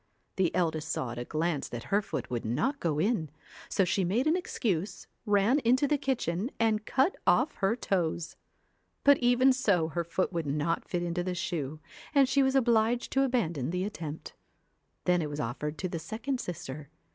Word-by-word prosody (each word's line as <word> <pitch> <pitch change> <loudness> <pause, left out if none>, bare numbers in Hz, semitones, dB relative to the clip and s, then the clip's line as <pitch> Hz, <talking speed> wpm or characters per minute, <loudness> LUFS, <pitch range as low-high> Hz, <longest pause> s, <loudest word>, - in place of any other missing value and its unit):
The 185 -3 +3
eldest 160 -3 0
saw 125 -5 -2
at 120 - -6
a 120 - -4
glance 155 0 -1
that 120 -1 -6
her 205 - +5
foot 130 - -5
would 120 -2 -2
not 155 - 0
go 160 -4 0
in, 170 -2 +1 0.4
so 195 - +2
she 190 +2 +1
made 210 +9 +1
an 310 +2 +3
excuse, 210 - -2 0.2
ran 205 +7 +4
into 260 +2 +3
the 290 0 +1
kitchen 230 - -1
and 215 -2 +1
cutoff 275 +8 +2
her 195 +3 +2
toes. 170 -7 -1 0.7
But 285 -1 +6
even 250 +2 +4
so 195 -11 +2
her 170 +1 -2
foot 175 +3 -1
would 165 -3 -2
not 150 +4 -1
fit~mfo 175 0 -1
tlie 180 0 -2
sEbe, 155 -4 -3 0.4
and 275 -2 +6
she 275 +2 +3
was 265 0 +2
obliged 235 -2 +2
to 270 - +2
abandon 170 - 0
the 180 +2 -1
attempt. 160 -6 -6 0.7
Then 180 -1 +3
it 150 - -3
was 145 0 -5
offered 150 +6 -3
to 185 - -2
the 170 -2 -4
second 230 - -3
sister. 155 - -6
180 Hz, 180 wpm, -29 LUFS, 160-240 Hz, 0.7 s, But